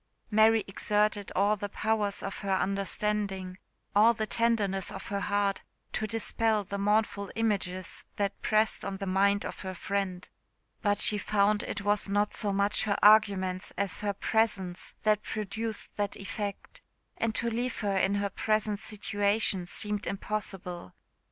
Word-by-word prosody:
Mary 220 +1 +5
exerted 210 +1 0
all 205 +2 +3
the 205 0 -5
powers 210 -1 -1
of 195 - -4
her 195 -2 0
understanding, 195 -1 -1 0.4
all 225 +3 +6
the 220 - -1
tenderness 210 -4 +1
of 190 -2 -7
her 200 - -1
heart, 200 -1 0 0.3
to 215 - -1
dispel 225 -1 +1
the 200 +1 -5
mournful 205 -1 +1
images 195 -5 -1
that 200 -1 -2
pressed 215 0 +2
on 195 - -4
the 195 - -4
mind 200 +2 +2
of - - -6
her 185 -1 -5
friend; 185 0 -2 0.5
but 205 -1 +2
she 210 - +2
found 205 0 +2
it 205 - -4
was 205 0 +1
not 205 +1 +1
so 205 - +2
much 200 +2 +1
her 200 -2 +1
_arguments 200 -4 +4
_as 200 0 0
her 205 -1 -1
presence 195 -4 0
that 215 -1 +3
produced 215 +1 -4
that 205 -1 -1
effect; 200 +1 -5 0.4
and 230 -1 -1
to 235 0 0
leave 245 +2 -2
her 200 -2 0
in 190 +1 +2
her 200 0 -1
present 215 0 0
situation 205 -2 0
seemed 210 +2 -1
impossible. 195 - -4
205 Hz, 150 wpm, -29 LUFS, 195-215 Hz, 0.5 s, all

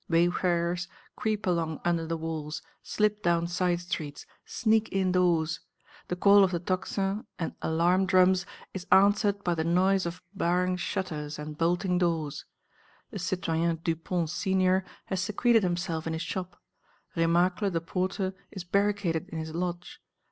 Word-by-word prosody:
Wayfarers 175 0 +1 0.3
creep 215 -1 -1
along 165 -4 0
under 170 -2 +1
the 165 0 -2
walls, 155 -2 -4 0.2
slip 210 0 0
down 170 -2 +2
side 175 0 0
streets, 155 -5 -5 0.2
sneak 220 -2 +1
indoors. 180 -4 +2 0.5
The 180 - -2
call 200 +2 +6
of 190 - +3
the 175 -2 -1
tocsin 195 +3 -2
and 165 - -3
alarm 175 +4 +2
drums 185 0 +4 0.3
is 185 -2 -6
answered 200 +1 +4
by 175 - +1
the 160 -1 -1
noise 185 +2 +2
of 175 +2 -7
barring 180 +1 +1
shutters 155 -5 -3
and 150 0 -6
bolting 180 +3 +1
doors. 165 -5 -1 0.7
The 205 - -5
citoyen 170 -2 0
Dupont 165 0 -1
senior 190 0 +2 0.2
has 190 -1 -2
secreted 225 +4 +3
himself 175 -3 -2
in 165 - -1
his 160 +1 -3
shop; 180 +1 -5 0.6
Remacle 175 +4 +2
the 170 -3 -1
porter 185 +3 -2 0.2
is 190 -4 -7
barricaded 200 -3 0
in 165 - -6
his 160 0 -5
lodge. 180 - -4
180 Hz, 145 wpm, -28 LUFS, 165-190 Hz, 0.7 s, call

